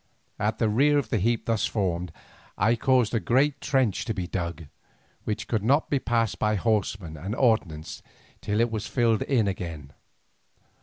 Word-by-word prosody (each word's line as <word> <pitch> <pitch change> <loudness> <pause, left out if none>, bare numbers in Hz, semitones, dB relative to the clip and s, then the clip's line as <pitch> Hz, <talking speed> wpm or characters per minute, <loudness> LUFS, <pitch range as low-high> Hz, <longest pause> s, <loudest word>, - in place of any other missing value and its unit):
At 105 +1 0
the 115 - +1
rear 140 +7 +3
of 135 -6 -1
the 110 - +1
heap 115 +4 0
thus 115 -3 +1
formed 90 -5 -2 0.5
I 110 +5 +3
caused 125 -1 +2
a 115 - +2
great 135 +5 +1
trench 130 -8 +1
to 110 - -2
be 90 -3 -3
dug, 85 -2 -4 0.6
which 105 0 -3
could 110 -4 -1
not 140 +7 +2
be 140 - +2
passed 115 -3 0
by 105 0 +1
horsemen 100 -5 -1
and 95 +9 -5
ordnance 110 - 0 0.4
till 105 0 -1
it 115 0 +2
was 110 -2 -3
filled 115 -4 +1
in 120 -7 +1
again. 85 -7 -5
110 Hz, 170 wpm, -26 LUFS, 95-120 Hz, 0.6 s, rear